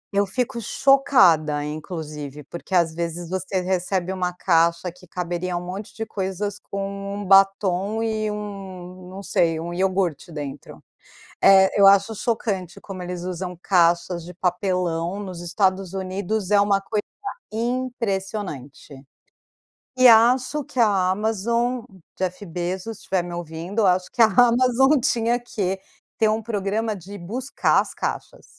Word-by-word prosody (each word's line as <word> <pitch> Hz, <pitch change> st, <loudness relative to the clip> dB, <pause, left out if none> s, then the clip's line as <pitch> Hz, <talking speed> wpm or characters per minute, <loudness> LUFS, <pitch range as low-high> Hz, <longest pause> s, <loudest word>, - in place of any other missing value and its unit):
Eu 200 Hz, 0 st, +3 dB
fico 235 Hz, +4 st, -2 dB
chocada, 190 Hz, -, +4 dB
inclusive, 150 Hz, -2 st, -6 dB
porque 170 Hz, +5 st, -6 dB
às 170 Hz, -2 st, +3 dB
vezes 170 Hz, +1 st, -4 dB
você 190 Hz, 0 st, -1 dB
recebe 185 Hz, 0 st, -1 dB
uma 180 Hz, -1 st, -1 dB
caixa 170 Hz, 0 st, +1 dB
que 180 Hz, +1 st, -18 dB
caberia 175 Hz, 0 st, -3 dB
um 175 Hz, -, -5 dB
monte 195 Hz, +3 st, -6 dB
de 225 Hz, -, -4 dB
coisas, 200 Hz, 0 st, -3 dB
com 200 Hz, 0 st, -5 dB
1 205 Hz, -, -5 dB
batom 195 Hz, +2 st, +3 dB
e 215 Hz, -1 st, -1 dB
1, 190 Hz, -3 st, -7 dB
não 195 Hz, +2 st, -8 dB
sei, 165 Hz, -3 st, +1 dB
1 170 Hz, +1 st, -5 dB
iogurte 185 Hz, -3 st, -1 dB
dentro. 145 Hz, -2 st, -8 dB, 0.6 s
É, 190 Hz, 0 st, +6 dB
eu 200 Hz, -, +8 dB
acho 200 Hz, +3 st, +5 dB
chocante 200 Hz, -6 st, -2 dB
como 195 Hz, -2 st, -8 dB
eles 180 Hz, -1 st, -5 dB
usam 180 Hz, 0 st, -5 dB
caixas 170 Hz, -1 st, +2 dB
de 180 Hz, +1 st, -10 dB
papelão, 180 Hz, 0 st, -1 dB
nos 185 Hz, -3 st, -7 dB
Estados 185 Hz, +1 st, 0 dB
Unidos 195 Hz, +1 st, -3 dB
é 205 Hz, -1 st, +5 dB
uma 200 Hz, -1 st, +3 dB
coisa 210 Hz, +2 st, -2 dB, 0.5 s
impressionante. 205 Hz, -, -4 dB, 0.9 s
E 255 Hz, -1 st, +6 dB
acho 250 Hz, +5 st, +5 dB
que 255 Hz, -, -3 dB
a 195 Hz, -5 st, +3 dB
Amazon, 230 Hz, +4 st, 0 dB, 0.4 s
Jeff 185 Hz, +2 st, -3 dB
Bezos, 185 Hz, +5 st, -4 dB
se -, -, -15 dB
estiver 190 Hz, -2 st, 0 dB
me 175 Hz, 0 st, -6 dB
ouvindo, 175 Hz, +5 st, -3 dB
acho 185 Hz, 0 st, +2 dB
que 240 Hz, -, +2 dB
a 225 Hz, -, +9 dB
Amazon 250 Hz, +5 st, +4 dB
tinha 235 Hz, -2 st, +1 dB
que 195 Hz, -6 st, -3 dB, 0.4 s
ter 220 Hz, -1 st, +3 dB
um 220 Hz, +1 st, -1 dB
programa 215 Hz, 0 st, -2 dB
de 200 Hz, +3 st, -10 dB
buscar 240 Hz, +10 st, +1 dB
as -, -, -9 dB
caixas. -, -, -5 dB
190 Hz, 145 wpm, -23 LUFS, 175-215 Hz, 0.9 s, a